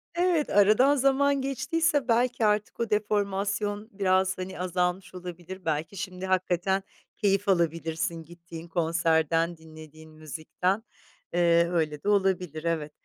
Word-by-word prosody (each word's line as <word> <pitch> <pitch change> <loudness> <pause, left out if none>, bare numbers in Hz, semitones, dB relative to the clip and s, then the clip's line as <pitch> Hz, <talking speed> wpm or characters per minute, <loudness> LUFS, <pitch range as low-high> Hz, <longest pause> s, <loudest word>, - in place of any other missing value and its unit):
Evet, 345 -3 +1
aradan 215 +8 +5
zaman 275 +1 +2
geçtiyse 275 +2 0
belki 240 0 +2
artık 210 0 0
o 230 -1 -1
deformasyon 205 0 -1
biraz, 190 -1 +1
hani, 185 0 -6
azalmış 180 0 -1
olabilir. 180 +1 -8
Belki 160 +4 -2
şimdi 185 -1 -5
hakikaten 185 +1 0 0.3
keyif 200 -1 +1
alabilirsin 165 -1 0
gittiğin 170 0 -11
konserden, 165 0 +1
dinlediğin 155 0 -13
müzikten. 160 +6 -3 0.5
Eee, 170 -1 +3
öyle 155 -4 -1
de 205 - 0
olabilir, 185 -6 +1
evet. 160 -3 -2
185 Hz, 120 wpm, -27 LUFS, 165-210 Hz, 0.5 s, aradan